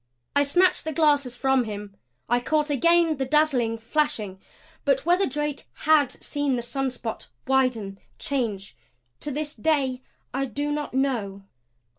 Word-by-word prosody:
I 285 - +5
snatched 355 +6 +3
the 315 - -3
glasses 285 -5 +2
from 265 -1 +2
him. 205 -2 -7 0.3
I 240 +1 +3
caught 300 +3 0
again 335 +2 +4
the 265 - 0
dazzling 260 -6 +2
flashing. 225 -6 -1 0.4
But 275 0 +1
whether 355 +3 +3
Drake 295 +1 -3
HAD 295 -4 +3
seen 290 -3 0
the 240 - -2
spot 255 -3 -4 0.2
widen, 245 -7 +1 0.2
change 220 -8 -3 0.4
to - - -4
this 295 +1 -3
day 275 -6 0 0.3
I 275 +1 0
do 290 +4 -3
not 295 -3 -3
know. 225 -8 -1
270 Hz, 140 wpm, -25 LUFS, 240-295 Hz, 0.4 s, I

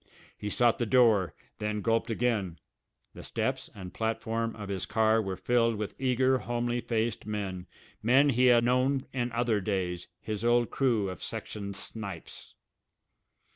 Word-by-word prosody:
He 105 - -5
sought 120 +2 +3
the 120 - 0
door, 110 -7 +4 0.2
then 105 0 -2
gulped 115 +1 +1
again. 110 -7 0 0.6
The - - -10
steps - - -2
and 95 -3 -8
platform 115 0 -2
of 105 -2 -7
his 95 -2 -3
car 110 0 +3
were 95 -3 -3
filled 115 +4 +2
with 105 -1 -4
eager, 130 0 +3
homely 120 0 -1
faced 115 -1 -1
men, 95 -4 -4 0.3
men 135 +6 +5
he 125 -1 +4
had 120 -1 +6
known 130 +2 +2
in 120 -1 -1
other 115 -3 +1
days, 90 -3 -2
his 105 0 -4
old 120 0 +3
crew 120 -7 +1
of 95 -3 -6
section 100 -2 -5
"snipes." 95 -3 -8
115 Hz, 150 wpm, -29 LUFS, 100-120 Hz, 0.6 s, had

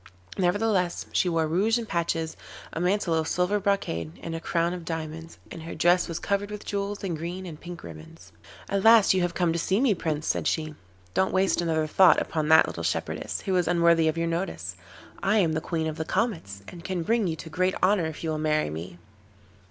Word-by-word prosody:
Nevertheless 185 -1 +1
she 180 - +2
wore 165 -1 +1
rouge 195 +9 +2
and 230 -2 -4
patches, 165 -2 -1 0.4
a - - -3
mantle 180 -1 +1
of 160 -1 0
silver 180 +4 +1
brocade 135 - -1
and 165 - -4
a 165 - -3
crown 170 +1 0
of 180 -2 -6
diamonds, 160 0 -6
and 165 - -7
her 165 - -7
dress 175 +2 +3
was 170 -2 -4
covered 200 0 -1
with 210 -1 -7
jewels, 200 0 -3
and 180 -4 -2
green 175 +4 -5
and 160 -4 -9
pink 175 0 -9
ribbons. 80 +1 -12 0.4
'At 200 -1 -1
last 225 -3 +7
you 185 - +1
have 175 -1 -1
come 175 -2 +1
to 170 - -1
see 190 +4 +1
me, 255 -4 +3
Prince,' 155 -4 -3
said - - 0
she. 155 -1 -1 0.4
'Don't 190 - +2
waste 190 -1 +2
another 160 -2 0
thought 185 +4 +5
upon 155 -2 -2
that 160 0 +7
little 85 - -6
shepherdess, 85 - -2
who 190 - -1
is 180 - +1
unworthy 170 -1 +4
of 160 +1 0
your 165 - 0
notice. 165 - -3 0.5
I 200 +3 +2
am 170 -6 +3
the 160 - -1
Queen 160 -1 -2
of 155 0 -3
the 160 - -2
Comets, 160 - -2
and 170 -1 -10
can 180 -3 -2
bring 225 +2 +1
you 160 - -1
to 160 0 -10
great 185 +2 +1
honour 185 -3 +3
if 160 0 -7
you 160 - -1
will 155 - -2
marry 155 - +1
me. 85 +3 -7
170 Hz, 220 wpm, -26 LUFS, 160-190 Hz, 0.5 s, last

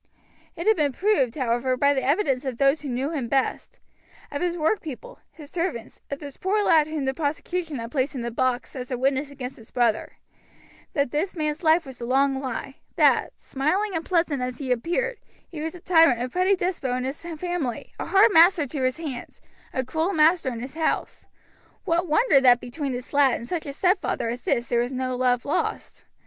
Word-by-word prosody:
It 340 0 -5
had 440 0 +5
been 290 -4 +1
proved, 315 - +1
however, 255 -1 0
by 280 +2 +4
the 265 - 0
evidence 275 -2 +1
of 260 -4 -4
those 275 +3 +3
who 290 - -5
knew 260 +4 -2
him 275 -7 -3
best, 270 +1 -1 0.5
of 285 - -4
his 350 -1 -1
workpeople, 330 - -2
his 300 -2 -13
servants, 335 -10 -4
of 280 - -3
this 285 -2 -9
poor 410 +3 +1
lad 315 -5 +4
whom 310 -3 -3
the 265 - 0
prosecution 315 +2 -3
had 230 0 -6
placed 270 -1 -1
in 245 - -3
the 235 - -3
box 250 +2 -1
as 250 -2 -6
a 250 - -2
witness 270 +2 0
against 265 -2 -7
his 225 - -15
brother, 235 -3 0 0.8
that 280 -4 0
this 345 +7 -1
man's 305 -1 -2
life 325 0 +4
was 260 -2 -11
a - - -3
long 270 +1 +2
lie; 265 0 -5 0.2
that, - - +3
smiling 340 +10 -1
and 325 - -1
pleasant 330 -7 0
as 250 -1 -3
he 265 -2 -4
appeared, 350 - -1 0.3
he 315 -4 -8
was 320 +2 -4
a - - -10
tyrant, 330 -8 +4
a 245 - -1
petty 370 +6 +2
despot 355 -7 -2
in 255 - -3
his 265 +3 -4
family, 340 -6 -4
a - - -4
hard 400 +3 +5
master 330 -1 +6
to 280 +1 -5
his 255 +1 0
hands, 290 -7 -7 0.3
a 260 -1 -2
cruel 320 +8 -1
master 320 -1 +4
in 230 -1 -6
his 260 +2 -7
house, 320 0 -2 0.6
What 340 0 +1
wonder 310 - +4
that 245 -2 +6
between 265 +3 -4
this 250 +3 -7
lad 280 -3 +4
and 235 - -7
such 330 -1 -3
a - - -3
stepfather 360 - 0
as 240 +1 -4
this 235 - 0
there 235 0 +1
was 245 +2 -2
no 255 -1 -2
love 250 -1 +1
lost. 285 - -3
285 Hz, 210 wpm, -25 LUFS, 255-330 Hz, 0.8 s, master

